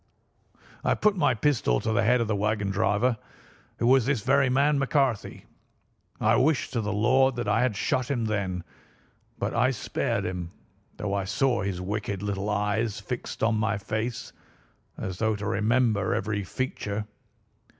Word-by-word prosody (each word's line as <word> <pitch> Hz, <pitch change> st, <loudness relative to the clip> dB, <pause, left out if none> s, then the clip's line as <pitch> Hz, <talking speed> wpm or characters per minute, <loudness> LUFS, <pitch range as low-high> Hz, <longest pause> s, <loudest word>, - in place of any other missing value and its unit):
I -, -, +2 dB
put 210 Hz, -1 st, +2 dB
my 145 Hz, -8 st, +2 dB
pistol 110 Hz, -, +1 dB
to 110 Hz, -, -1 dB
the 120 Hz, -, +3 dB
head 120 Hz, +2 st, +3 dB
of 115 Hz, -, 0 dB
the 110 Hz, -, 0 dB
wagon 105 Hz, -1 st, 0 dB
driver, 110 Hz, +3 st, +1 dB, 0.6 s
who -, -, -1 dB
was 130 Hz, 0 st, +4 dB
this 135 Hz, -5 st, +1 dB
very 135 Hz, +3 st, +3 dB
man 140 Hz, +3 st, +3 dB
McCarthy. 135 Hz, -4 st, 0 dB, 0.7 s
I -, -, +3 dB
wish 145 Hz, +1 st, +2 dB
to 115 Hz, -, -1 dB
the 105 Hz, 0 st, -2 dB
Lord 130 Hz, +5 st, +3 dB
that 120 Hz, -2 st, -3 dB
I 105 Hz, +3 st, +2 dB
had 125 Hz, -4 st, +1 dB
shot 125 Hz, +4 st, 0 dB
him 120 Hz, -5 st, 0 dB
then, 95 Hz, -5 st, -2 dB, 0.7 s
but -, -, -2 dB
I 125 Hz, +2 st, +3 dB
spared 130 Hz, -, -2 dB
him, 90 Hz, -2 st, -4 dB, 0.5 s
though 100 Hz, -1 st, -3 dB
I 100 Hz, -1 st, -1 dB
saw 120 Hz, +3 st, +1 dB
his 100 Hz, -2 st, -2 dB
wicked 100 Hz, +1 st, -3 dB
little 100 Hz, 0 st, -2 dB
eyes 105 Hz, +1 st, 0 dB
fixed -, -, -5 dB
on 115 Hz, +1 st, +3 dB
my 110 Hz, 0 st, 0 dB
face, 110 Hz, +3 st, -4 dB, 0.6 s
as 95 Hz, -1 st, -5 dB
though 110 Hz, -1 st, +1 dB
to 100 Hz, 0 st, -5 dB
remember 110 Hz, -1 st, +1 dB
every 105 Hz, 0 st, -2 dB
feature. 105 Hz, -1 st, -3 dB
110 Hz, 165 wpm, -27 LUFS, 100-125 Hz, 0.7 s, was